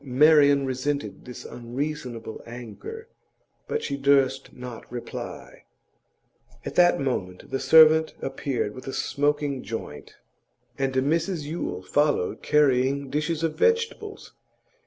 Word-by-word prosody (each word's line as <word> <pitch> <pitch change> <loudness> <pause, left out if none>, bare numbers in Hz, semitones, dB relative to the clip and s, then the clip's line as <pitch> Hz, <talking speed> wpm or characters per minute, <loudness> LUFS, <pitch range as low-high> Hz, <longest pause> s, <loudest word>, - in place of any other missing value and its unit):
Marian 145 +1 +5
resented 135 +2 -3
this 125 - -9
unreasonable 120 -2 -5
anger, 125 - -9 0.6
but 455 - -2
she 140 - -3
durst 135 -1 +2
not 125 -2 -10
reply. 120 -1 -8 1.0
At - - -4
that 175 0 +5
moment 95 -10 -3
the 135 - -1
servant 160 0 +6
appeared 135 -5 -3
with 130 - -11
a 135 - -4
smoking 145 -2 0
joint, 105 -9 -7 0.6
and 135 -1 -1
Mrs 160 +5 0
Yule 145 - -4
followed 145 -1 +1
carrying 140 -1 +2
dishes 155 +2 -1
of 165 -1 0
vegetables. 460 - -1
140 Hz, 115 wpm, -25 LUFS, 125-155 Hz, 1.0 s, servant